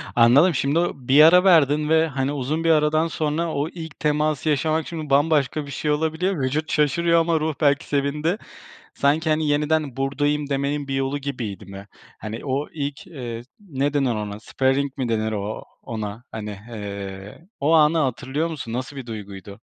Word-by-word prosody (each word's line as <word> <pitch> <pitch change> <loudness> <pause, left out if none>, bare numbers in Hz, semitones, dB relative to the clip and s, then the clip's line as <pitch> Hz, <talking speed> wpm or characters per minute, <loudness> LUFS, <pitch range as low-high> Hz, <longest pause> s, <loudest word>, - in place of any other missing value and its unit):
Anladım, 135 +9 +6
şimdi 140 +5 +1
o 175 - +1
bir 135 +3 +4
ara 180 +3 +7
verdin 150 -4 +4
ve, 160 0 +4
hani, 135 -2 -2
uzun 145 +3 -2
bir 165 - +2
aradan 155 +1 +3
sonra 160 +1 -2
o 145 +3 -1
ilk 160 -3 -9
teması 150 0 0
yaşamak 155 +2 0
şimdi 155 -4 -6
bambaşka 145 0 +2
bir 140 - -9
şey 150 +3 -1
olabiliyor. 160 +3 0
Vücut 150 +5 -1
şaşırıyor 170 +3 +3
ama 165 -1 +1
ruh 155 0 -1
belki 145 -1 +3
sevindi. 150 +6 0 0.6
Sanki, 155 +3 +1
hani, 155 0 +1
"Yeniden 150 -2 0
buradayım." 145 +2 0
demenin 140 +1 -2
bir 135 - -2
yolu 135 +1 -1
gibiydi 120 -8 -5
mi? 100 +1 -10 0.3
Hani, 110 +2 -7
o 140 +1 -2
ilk, 145 +1 -5
eee, 120 -8 -6 0.2
ne 145 -7 -2
denir 135 -5 +1
ona, 105 0 -5
sparing 135 +3 0
mi 125 -2 -1
denir 110 -1 0
o 105 0 -4 0.2
ona, 110 +1 -6
hani, 105 -1 -6
hee, 100 - -8
o 145 +3 +2
anı 160 0 +5
hatırlıyor 135 +3 -1
musun 145 -8 -6
nasıl 130 +4 -4
bir 130 -3 -7
duyguydu? 100 -2 -8
145 Hz, 175 wpm, -23 LUFS, 125-155 Hz, 0.6 s, ara